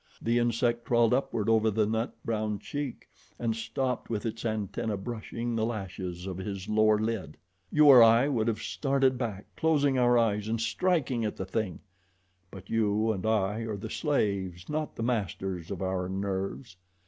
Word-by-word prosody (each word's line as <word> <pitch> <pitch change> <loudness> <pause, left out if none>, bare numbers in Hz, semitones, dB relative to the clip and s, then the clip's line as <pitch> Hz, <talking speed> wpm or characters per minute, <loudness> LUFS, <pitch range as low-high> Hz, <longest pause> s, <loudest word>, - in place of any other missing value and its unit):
The 120 +1 +1
insect 120 0 +1
crawled 120 -1 +3
upward 115 -5 0
over 110 0 +4
the 110 0 +2
nut 110 +2 -2
brown 110 -2 -1
cheek 145 +4 -5 0.3
and 115 -2 -1
stopped 125 +3 -2
with 110 -2 -2
its 115 0 -4
antennae 110 -1 -2
brushing 115 +2 -4
the 110 - 0
lashes 95 -5 -4
of 95 -2 -5
his 95 0 -5
lower 110 0 +4
lid. 110 -8 -3 0.3
You 150 0 +5
or 135 -4 +10
I 115 +3 +6
would 120 -6 0
have 115 -2 -1
started 135 -2 +1
back, 105 -5 -3
closing 145 -4 +2
our 120 0 +4
eyes 105 -3 +1
and 115 +1 -1
striking 130 0 0
at 105 - -2
the 95 - -3
thing; 95 -1 -3 0.7
but 95 0 -11
you 110 0 +1
and 100 -1 -3
I 105 -1 +1
are 110 -2 -3
the 110 +2 -7
slaves, 100 - -1
not 155 0 -3
the 115 - -4
masters 95 -6 -2
of 95 -1 -4
our 95 -1 -1
nerves. 95 +2 -4
110 Hz, 170 wpm, -29 LUFS, 100-120 Hz, 0.7 s, or